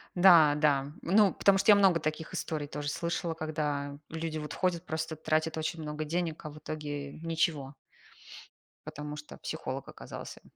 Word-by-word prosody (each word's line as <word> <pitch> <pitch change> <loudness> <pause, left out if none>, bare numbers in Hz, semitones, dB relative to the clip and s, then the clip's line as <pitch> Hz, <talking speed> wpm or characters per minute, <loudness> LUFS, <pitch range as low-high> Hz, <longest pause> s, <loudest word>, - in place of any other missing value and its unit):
Да-да. 150 -6 +6
Ну, 200 +2 +4
потому 200 -1 +4
что 195 +2 +5
я - - +9
много 190 -4 +5
таких 155 +1 -3
историй 150 -2 -3
тоже 145 0 -4
слышала, 170 +1 -2
когда 150 -3 -3
люди, 160 -1 -3
вот, 150 0 -6
ходят, 180 -2 0
просто, 160 0 -3
тратят 155 +1 0
очень 160 +1 -2
много 150 0 -4
денег, 165 +1 -2
а 150 - -3
в 150 - -11
итоге 145 -2 -5
ничего. 160 -4 -1 1.1
Потому 150 0 -6
что 150 0 -10
психолог - - -5
оказался - - -9
155 Hz, 155 wpm, -30 LUFS, 150-165 Hz, 1.1 s, я